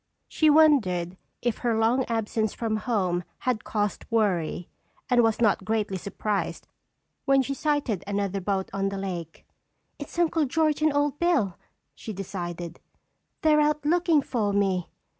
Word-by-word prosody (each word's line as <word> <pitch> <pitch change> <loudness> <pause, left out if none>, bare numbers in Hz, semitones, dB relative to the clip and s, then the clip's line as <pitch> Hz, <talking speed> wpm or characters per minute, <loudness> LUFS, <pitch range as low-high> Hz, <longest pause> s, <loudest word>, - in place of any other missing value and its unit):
She 310 - +3
wondered 215 - +4 0.3
if 240 -2 0
her 235 -3 0
long 235 +4 +2
absence 220 -1 -1
from 220 -2 -1
home 190 -6 0 0.2
had 250 -4 -1
caused 205 -2 -2
worry 185 -7 0 0.4
and 245 -1 +6
was 225 -2 +2
not 210 -4 +2
greatly 210 -2 -1
surprised 200 +2 -3 0.6
when 275 -1 +4
she 275 - -3
sighted 285 - -1
another 200 -1 -1
boat 190 0 -2
on 195 0 0
the 195 - -5
lake. 175 -4 -6 0.5
"It's 290 +3 -8
Uncle 330 -2 +2
George 305 +2 +1
and 310 0 +4
Old 290 0 0
Bill," 285 - +2 0.4
she 220 - -7
decided. 175 -3 -6 0.6
"They're 305 -1 +5
out 300 0 +1
looking 330 -2 +3
for 220 -7 -1
me." 190 -3 +1
220 Hz, 145 wpm, -26 LUFS, 195-285 Hz, 0.6 s, and